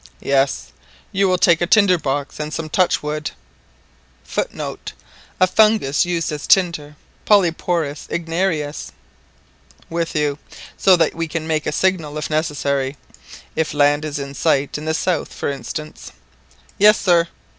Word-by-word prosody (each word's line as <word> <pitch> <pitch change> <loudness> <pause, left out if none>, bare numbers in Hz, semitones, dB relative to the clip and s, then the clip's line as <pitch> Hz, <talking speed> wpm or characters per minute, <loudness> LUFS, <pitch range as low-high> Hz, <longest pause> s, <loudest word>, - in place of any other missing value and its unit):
"Yes. 135 0 0 0.4
You 195 0 +2
will 185 -1 +2
take 170 -1 +4
a 175 - +1
tinder 195 -3 +4
box 145 0 -3
and 150 0 -4
some 155 0 -4
touchwood 150 -4 0 0.9
[Footnote: - - -4 0.5
A 185 - +6
fungus 210 -8 +3
used 170 -3 -1
as 150 -1 -5
tinder 165 -6 +2 0.3
(Polyporous 170 -6 +1
igniarius).] 165 -3 -2 1.0
with 170 0 -2
you, 150 -1 0 0.4
so 190 - +5
that 165 -3 +2
we 165 0 -3
can 160 0 -4
make 155 -1 -1
a - - 0
signal 160 -3 0
if 155 - -4
necessary—if 145 0 -3
land 145 +1 +3
is 150 -2 -4
in 140 -1 -6
sight 140 -1 +1
in 150 - -5
the 160 0 0
south, 170 -2 -1
for - - -2
instance" 150 +2 -7 0.7
"Yes, 210 +1 +6
sir." 170 -3 +3
155 Hz, 135 wpm, -20 LUFS, 145-175 Hz, 1.0 s, A